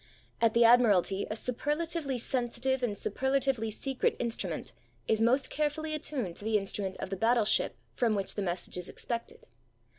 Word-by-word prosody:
At 230 -1 +3
the 235 - +6
Admiralty 205 -5 +4
a 215 - -2
superlatively 295 +4 -2
sensitive 250 +1 -1
and 220 -5 -1
superlatively 265 0 0
secret 265 +5 -1
instrument 235 -1 -2 0.3
is 220 0 +2
most 250 +5 +3
carefully 305 +1 -1
attuned 260 - -2
to - - -7
the 220 0 +2
instrument 195 -1 -2
of 185 - -6
the - - 0
battleship 225 +1 +2 0.2
from 230 -3 +1
which 195 -1 -2
the 205 - -3
message 180 -1 -2
is 180 0 -4
expected. 235 -1 -5
235 Hz, 155 wpm, -30 LUFS, 210-265 Hz, 0.3 s, the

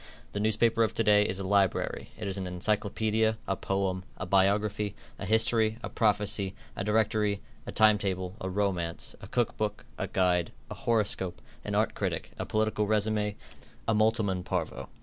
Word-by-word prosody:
The 100 - -3
newspaper 110 +2 +2
of 110 - +2
to 115 - +2
day 105 -1 +5
is 95 - -1
a 95 - -4
library. 95 -1 +1
It 110 - -4
is 95 - -1
an 95 - -3
encyclopaedia, 110 +4 0
a 95 - +1
poem, 95 -1 -1
a 95 - -4
biography, 100 +2 +2 0.2
a 100 - -4
history, 110 0 +3
a - - -3
prophecy, 105 -3 +1 0.2
a - - -2
directory, 105 -1 +2 0.3
a - - -3
time 110 -1 +5
table, 95 -2 -2
a 95 - -2
romance, 90 -4 -1
a - - -8
cook 120 -3 0
book, 105 -1 -2
a - - -1
guide, 90 -2 +1 0.2
a - - -2
horoscope, 100 -5 0 0.2
an - - -3
art - - +2
critic, - - -3
a - - -3
political 110 -1 +1
resume, 105 -1 +1 0.5
a 115 - +3
multum 110 0 +3
in 90 -1 -2
parvo. - - -3
105 Hz, 175 wpm, -29 LUFS, 95-110 Hz, 0.5 s, day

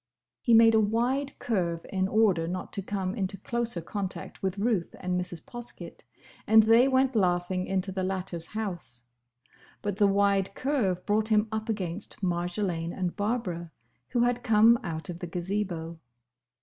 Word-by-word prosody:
He 235 - +4
made 225 0 +7
a 220 - +5
wide 245 +6 0
curve 170 -7 -1
in 190 0 +1
order 195 -6 +3
not 185 +1 -5
to 195 - -1
come 190 -1 -3
into 195 -2 -3
closer 235 -2 -2
contact 190 +2 -5
with 190 0 -2
Ruth 205 -4 0
and 180 -1 -2
Mrs. 180 -2 -3
Poskett, 240 -1 -8 0.4
and 220 0 +7
they 230 +4 +6
went 265 -1 +2
laughing 180 -2 +1
into 190 0 -1
the 190 0 -3
latter's 185 -3 -2
house. 175 - -5 0.8
But 205 -2 -2
the 205 -2 +5
wide 200 -1 +2
curve 225 -11 0
brought 210 +1 +2
him 215 0 +3
up 220 +1 -3
against 195 -1 -4
Marjolaine 175 -1 -1
and 180 -2 -2
Barbara, 205 -6 -2 0.4
who 240 - +1
had 245 0 +2
come 225 +1 +5
out 160 -2 -4
of 175 -1 -6
the 175 - -5
Gazebo. 175 -2 -3
195 Hz, 160 wpm, -28 LUFS, 180-220 Hz, 0.8 s, made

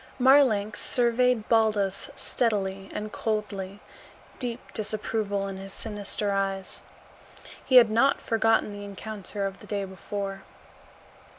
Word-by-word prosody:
Marlanx 250 -6 +4
surveyed 245 -2 +2
Baldos 210 -4 +2
steadily 195 -4 -1
and 210 0 -5
coldly, 205 -3 -3 0.6
deep 245 -1 -3
disapproval 210 -1 -1
in 195 -1 -6
his 195 0 -6
sinister 205 -1 -1
eyes. 195 -1 -2 0.8
He 260 - +1
had 235 -3 +8
not 270 +5 +3
forgotten 225 -1 +2
the 205 0 -7
encounter 200 0 -5
of 195 0 -5
the - - -13
day 200 -2 -2
before. 195 +1 -5
210 Hz, 115 wpm, -27 LUFS, 195-225 Hz, 0.8 s, had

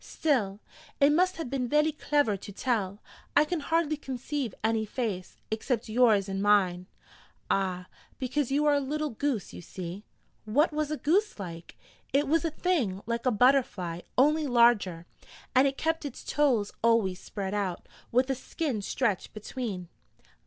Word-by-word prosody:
'Still, 215 -11 0 0.4
it 285 0 +6
must 365 +4 +3
have 325 - -4
been 250 -1 -2
vely 300 +3 +3
clever 290 -7 +1
to 200 +1 -9
tell. 205 -3 -2 0.3
I 295 - +6
can 340 +2 -2
hardly 315 0 0
conceive 265 -3 -4
any 220 0 +2
face, 210 -5 -4
except 225 +1 -1
yours 215 -4 +4
and 195 0 -3
mine.' 185 -3 +3 0.6
'Ah, 185 -2 0 0.3
because 260 +1 -1
you 290 +2 +2
are 295 - +5
a 285 - +3
little 300 +2 -2
goose, 235 -3 -2
you - - -8
see.' 180 +3 -7 0.4
'What 290 +9 +2
was 305 -1 -1
a 305 - -2
goose 390 +10 +1
like?' 170 -4 -8 0.4
'It 285 +1 +3
was 325 +4 +2
a 330 - +1
thing 295 - -1
like 235 +2 -2
a - - +4
butterfly, 210 -8 +2 0.2
only 300 +3 +4
larger, 235 -9 +3 0.5
and 265 +2 +5
it 275 0 -2
kept 325 0 0
its 285 -4 -7
toes 250 -9 +1
always 220 -6 +3
spread 195 -1 -5
out, 195 -4 -2 0.2
with 255 +2 +3
a - - +2
skin 265 -2 -3
stretched 210 -1 -1
between.' 215 -4 -5
245 Hz, 160 wpm, -28 LUFS, 200-295 Hz, 0.6 s, it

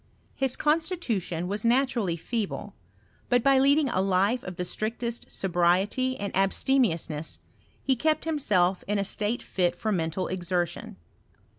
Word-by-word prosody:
His 265 -2 +1
constitu 315 - 0
tion 170 0 -4
was 205 +2 -3
naturally 235 -7 +1
feeble; 220 +4 -4 0.6
but 245 -2 +3
by 275 -1 +5
leading 280 +2 +4
a 185 -7 0
life 195 +5 +2
of 180 - -7
the 180 - -3
iftrictest 230 +5 -3
sobriety 190 +8 +1
and 200 -1 -4
abstemiousness 190 - +1 0.5
he 265 - +2
kept 310 +6 0
him 320 -2 -1
kM. 185 -7 +2
ia 210 - +1
a - - +1
state 210 +4 -1
fit 175 -2 0
for 220 - -2
mental 165 -1 -1
exertion. 175 - -2
205 Hz, 145 wpm, -27 LUFS, 180-260 Hz, 0.6 s, by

